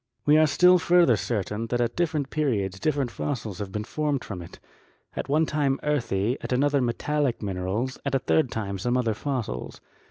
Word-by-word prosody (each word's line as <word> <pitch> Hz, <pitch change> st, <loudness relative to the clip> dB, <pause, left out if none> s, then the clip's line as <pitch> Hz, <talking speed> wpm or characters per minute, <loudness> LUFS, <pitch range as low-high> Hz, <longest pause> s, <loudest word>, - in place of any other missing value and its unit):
"We 150 Hz, -, +5 dB
are 155 Hz, -, +5 dB
still 180 Hz, +5 st, +5 dB
further 170 Hz, -7 st, +4 dB
certain 105 Hz, +2 st, -2 dB
that 120 Hz, +1 st, -1 dB
at 120 Hz, -1 st, 0 dB
different 155 Hz, -5 st, -1 dB
periods 100 Hz, -11 st, -1 dB
different 140 Hz, -3 st, 0 dB
fossils 110 Hz, -10 st, -4 dB
have 100 Hz, -2 st, -5 dB
been 105 Hz, +1 st, -3 dB
formed 145 Hz, +4 st, -2 dB
from 95 Hz, -4 st, -6 dB
it, 85 Hz, -, -12 dB, 0.6 s
at -, -, -4 dB
one 155 Hz, +3 st, +3 dB
time 145 Hz, -3 st, 0 dB
earthy, 120 Hz, -5 st, 0 dB
at -, -, -6 dB
another 140 Hz, +2 st, +2 dB
metallic 130 Hz, +1 st, -1 dB
minerals, 100 Hz, +7 st, -2 dB
at 140 Hz, -1 st, -1 dB
a -, -, +5 dB
third 135 Hz, +1 st, +1 dB
time 100 Hz, -4 st, -4 dB
some 120 Hz, +5 st, 0 dB
other 115 Hz, -3 st, +1 dB
fossils. 115 Hz, -, -4 dB
125 Hz, 185 wpm, -26 LUFS, 105-145 Hz, 0.6 s, We